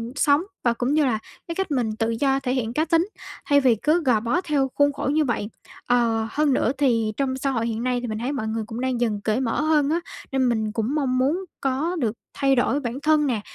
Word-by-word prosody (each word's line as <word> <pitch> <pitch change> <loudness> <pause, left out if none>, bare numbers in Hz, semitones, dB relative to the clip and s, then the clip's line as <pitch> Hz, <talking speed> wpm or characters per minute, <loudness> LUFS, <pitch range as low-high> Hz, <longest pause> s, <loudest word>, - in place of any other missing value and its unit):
sống 290 +2 +3 0.2
và 235 - +3
cũng 245 +4 -1
như 305 -1 +3
là 230 -5 +1 0.3
cái 335 - -4
cách 385 -3 -2
mình 235 -6 0
tự 225 +1 -1
do 270 +4 +1
thể 255 -2 -2
hiện 235 -3 -2
cá 310 +4 +1
tính, 330 +3 +2 0.4
thay 285 0 +4
vì 255 -4 +4
cứ 305 - +1
gò 250 -6 +3
bó 240 +11 0
theo 290 -6 0
khuôn 285 0 +3
khổ 275 - -3
như 310 0 +3
vậy. 225 -4 -2 0.4
Ờ, 230 -2 +2
hơn 295 -2 +2
nữa 245 - +2
thì 230 -6 +2
trong 265 -2 -1
xã 275 +1 -1
hội 230 -3 -1
hiện 230 0 -3
nay 250 -1 0
thì 245 - -4
mình 215 -1 -3
thấy 245 +4 -2
mọi 220 -6 -3
người 220 0 -2
cũng 230 +1 -5
đang 255 -2 -1
dần 215 -4 0
cởi 220 +4 0
mở 240 +2 0
hơn 305 -2 +2
á, 330 +2 +1 0.3
nên 265 -2 +2
mình 220 -2 0
cũng 225 +6 -1
mong 265 -4 0
muốn 300 +9 +1 0.2
có 275 +6 0
được 225 -6 0 0.2
thay 275 -1 +2
đổi 265 +3 +2
bản 250 -1 -4
thân 305 -1 +3
nè, 235 -5 -1
260 Hz, 255 wpm, -23 LUFS, 230-290 Hz, 0.4 s, thay